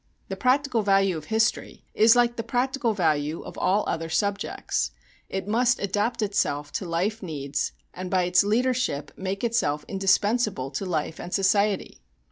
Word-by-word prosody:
The 195 - -3
practical 255 +2 +2
value 195 -2 +3
of 155 -1 -6
history 220 +3 -1
is 225 +2 +6
like 240 -1 +3
the 230 - -2
practical 245 0 0
value 155 -3 0
of - - -9
all 200 +3 +2
other 165 0 -2
subjects 200 +4 -1 0.4
it 190 0 -4
must 245 +3 +2
adapt 210 +4 -1
itself 145 -8 -1
to 185 - -4
life 195 +7 -1
needs, 145 -5 -3 0.2
and 185 0 -6
by 185 -1 +2
its 180 +1 +4
leadership 230 - 0
make 190 +2 -4
itself 190 -11 0
indispensable 195 - +1
to 150 +8 -4
life 160 -2 -2
and 175 - -7
society. 200 +1 +1
195 Hz, 155 wpm, -25 LUFS, 170-225 Hz, 0.4 s, is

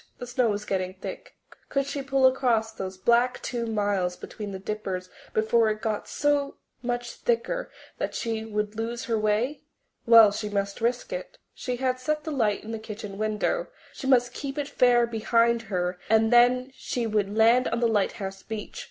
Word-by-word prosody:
The 245 - -6
snow 245 -1 +1
was 210 0 -2
getting 185 -1 -2
thick. 190 - -8 0.3
Could 275 -1 0
she 280 0 -3
pull 270 -1 +2
across 245 -4 +3
those 190 -3 -6
black 240 +5 +3
two 235 -2 -2
miles 205 -5 0
between 210 -2 -7
the 190 - -5
Dippers 190 -2 -4 0.2
before 220 +1 +3
it 215 0 -2
got 215 -1 -2
so 290 -1 0 0.3
much 245 -1 -2
thicker 240 - -1 0.3
that - - -2
she 225 -2 -2
would 210 -1 -3
lose 235 +2 -3
her 230 -3 0
way? 215 +7 0 0.5
Well, 225 -3 +9
she 210 +1 -4
must 200 0 -2
risk 245 - -1
it. - - -6 0.2
She 250 - -3
had 255 0 -1
set 300 +4 -1
the 315 - -4
light 220 -8 +1
in 220 - -7
the 225 - -4
kitchen 210 -2 -8
window; 215 - 0 0.3
she 265 - -6
must 245 -2 +4
keep 275 +1 -5
it 290 -1 -1
fair 245 -4 +4
behind 235 +1 +2
her 180 -2 -1
and 220 +1 +4
then 250 +2 +5
she 250 -2 -3
would 210 -1 0
land 235 +3 +5
on 230 - -1
the 235 - +3
lighthouse 195 -2 -1
beach. 220 - -6
230 Hz, 185 wpm, -26 LUFS, 210-250 Hz, 0.5 s, Well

